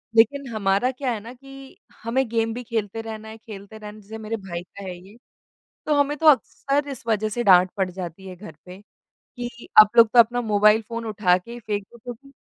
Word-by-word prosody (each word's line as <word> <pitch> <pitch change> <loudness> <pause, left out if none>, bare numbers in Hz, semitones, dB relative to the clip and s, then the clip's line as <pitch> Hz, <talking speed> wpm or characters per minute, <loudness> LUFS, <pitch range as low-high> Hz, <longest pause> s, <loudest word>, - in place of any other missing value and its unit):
लेकिन 265 +5 +3
हमारा 200 +4 +1
क्या 260 0 -3
है 220 - -4
ना 230 +4 -11
कि 270 +1 -14 0.3
हमें 250 +3 0
गेम 225 0 -1
भी 245 +2 -6
खेलते 225 -2 -3
रहना 220 -1 -8
है, 220 - -10
खेलते 215 -2 -11
रहने 215 0 -11
जैसे 215 +2 -10
मेरे 220 +1 -4
भाई 185 -4 -7
का 200 +2 -13
है 185 -2 -6
ये, 190 +5 -16 0.7
तो 300 - +2
हमें 285 0 +1
तो 320 - -1
अक्सर 285 0 +2
इस 265 -3 -8
वजह 215 -1 0
से 240 +3 -3
डाँट 185 -2 +6
पड़ 190 -2 -1
जाती 180 0 -8
है 185 - -9
घर 175 -3 -11
पे, 180 +1 -12 0.4
कि 240 -1 -10
आप 215 -1 +6
लोग 230 -1 +8
तो 245 - +6
अपना 240 +1 +4
मोबाइल 210 0 +3
फ़ोन 230 +1 -7
उठा 205 -5 +2
के 235 +6 -10
फ़ेक 210 -3 -4
दो 235 - -15
तो 245 - -5
भी 275 +4 -20
220 Hz, 220 wpm, -23 LUFS, 200-245 Hz, 0.7 s, लोग